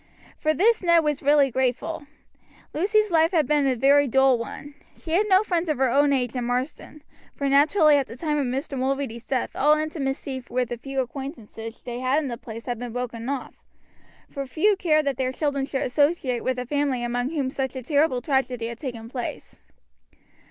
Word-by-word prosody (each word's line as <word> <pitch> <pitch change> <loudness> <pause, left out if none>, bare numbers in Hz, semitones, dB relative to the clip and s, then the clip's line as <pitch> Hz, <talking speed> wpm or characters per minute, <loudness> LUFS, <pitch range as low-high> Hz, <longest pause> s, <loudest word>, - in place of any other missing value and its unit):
For 310 0 +1
this 445 - +3
Ned 340 -2 +4
was 295 -2 -1
really 285 -1 +4
grateful. 260 +5 -2 0.7
Lucy's 420 +5 +2
life 325 -1 +4
had 315 -4 +3
been 290 +1 +2
a 260 - +2
very 280 +3 +4
dull 265 0 +4
one. 285 +5 -7 0.2
She 320 - -9
had 395 +6 +2
no 380 +1 +5
friends 350 -4 -1
of 305 - 0
her 260 -2 +2
own 285 +2 +4
age 250 -4 0
in 250 -2 -2
Marsden, 260 +4 -4 0.3
for 280 - -2
naturally 295 +2 +5
at 275 - 0
the 230 - -9
time 300 +3 -1
of 275 - 0
Mr. 270 +3 -3
Mulready's 260 -3 -2
death 260 -3 -2
all 300 +2 +4
intimacy 275 -4 -3
with 250 -1 -1
the 240 - -5
few 270 +1 -2
acquaintances 235 -4 -8
they 240 -1 -5
had 255 +2 +1
in 300 -3 -1
the 235 - -4
place 230 -1 -9
had 245 -2 -3
been 245 -2 -6
broken 245 -1 -4
off, 280 -2 -4 0.7
for 275 -2 -6
few 400 +10 +2
cared 310 -5 +2
that 275 -3 -1
their 255 -1 0
children 280 -1 -1
should 270 - -2
associate 280 -2 +1
with 260 -1 -1
a 250 - -3
family 280 -2 -1
among 245 +1 -1
whom 285 -5 -2
such 265 -1 -3
a 260 - -5
terrible 285 -2 +1
tragedy 255 -5 0
had 235 0 -8
taken 235 -5 -6
place. 245 0 -6
270 Hz, 200 wpm, -24 LUFS, 250-300 Hz, 0.7 s, no